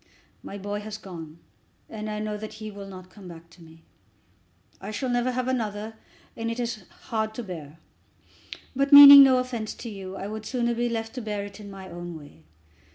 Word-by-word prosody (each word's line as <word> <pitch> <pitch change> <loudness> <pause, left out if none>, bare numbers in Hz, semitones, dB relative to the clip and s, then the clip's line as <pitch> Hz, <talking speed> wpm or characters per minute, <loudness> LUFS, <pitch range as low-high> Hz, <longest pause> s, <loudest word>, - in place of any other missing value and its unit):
My 200 - -8
boy 205 +1 -4
has 210 0 -7
gone, 165 -6 -10 0.5
and 215 -1 -6
I 210 - -4
know 215 0 -3
that 215 +1 -7
he 215 -1 -8
will 200 -1 -9
not 185 -1 -11
come 195 -2 -13
back 170 -1 -13
to 170 - -18
me. 165 0 -17 1.0
I 195 - -7
shall 235 +5 -3
never 245 +1 0
have 255 0 -2
another, 220 -4 -3 0.4
and 230 0 -3
it 230 +1 -4
is 235 -5 -4
hard 220 -1 -4
to 240 - -5
bear. 165 -6 -9 1.0
But, 275 +2 0
meaning 285 0 +12
no 265 -2 +6
offence 245 -4 -3
to 235 - -8
you, 195 -2 -8
I 195 - -6
would 215 +1 -6
sooner 240 -2 -1
be 240 +1 -1
left 225 -1 -4
to 255 - -5
bear 210 -2 -4
it 205 +1 -11
in 205 -1 -10
my 195 -1 -10
own 175 -1 -8
way. 145 - -16
215 Hz, 205 wpm, -25 LUFS, 190-235 Hz, 1.0 s, meaning